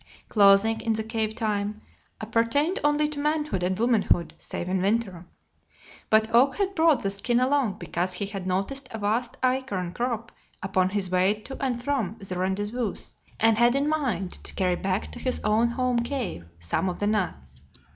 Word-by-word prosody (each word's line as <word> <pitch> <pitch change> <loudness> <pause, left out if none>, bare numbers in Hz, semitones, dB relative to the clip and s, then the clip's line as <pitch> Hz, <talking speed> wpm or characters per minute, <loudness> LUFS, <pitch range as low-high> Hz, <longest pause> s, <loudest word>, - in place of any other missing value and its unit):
Clothing, 205 +2 +5
in 225 - 0
the 220 0 -2
cave 220 -1 -2
time, 210 -1 -2 0.4
appertained 230 - +1
only 295 +1 +3
to 300 -1 -6
manhood 300 - 0
and 185 +1 0
womanhood, 220 -7 +2
save 175 - -5
in 185 0 0
winter. 195 -4 -1 0.8
But 220 +1 +3
Oak 260 +4 +5
had 395 -1 -1
brought 320 -6 +4
the 195 - -1
skin 235 +5 +1
along 255 -4 +1
because 175 +1 -2
he 190 +3 -2
had 195 -2 -6
noticed 200 +9 -2
a 225 - -6
vast 225 +3 -1
acorn 230 -9 -1
crop 235 0 -3 0.3
upon 190 -1 +1
his 190 -2 -2
way 185 +3 +3
to 270 +5 -8
and 245 -3 -1
from 245 -9 -1
the 195 -4 -6
rendezvous 205 +5 -1 0.4
and 225 0 +4
had 240 +1 +5
in 280 +1 +1
mind 245 - -1
to - - -8
carry 180 -2 +1
back 190 +2 -2
to - - -8
his 255 +1 0
own 215 +3 +3
home 250 0 0
cave 235 - -3
some 85 - -1
of 180 - -4
the 205 - -1
nuts. 75 - -2
220 Hz, 175 wpm, -26 LUFS, 190-250 Hz, 0.8 s, Clothing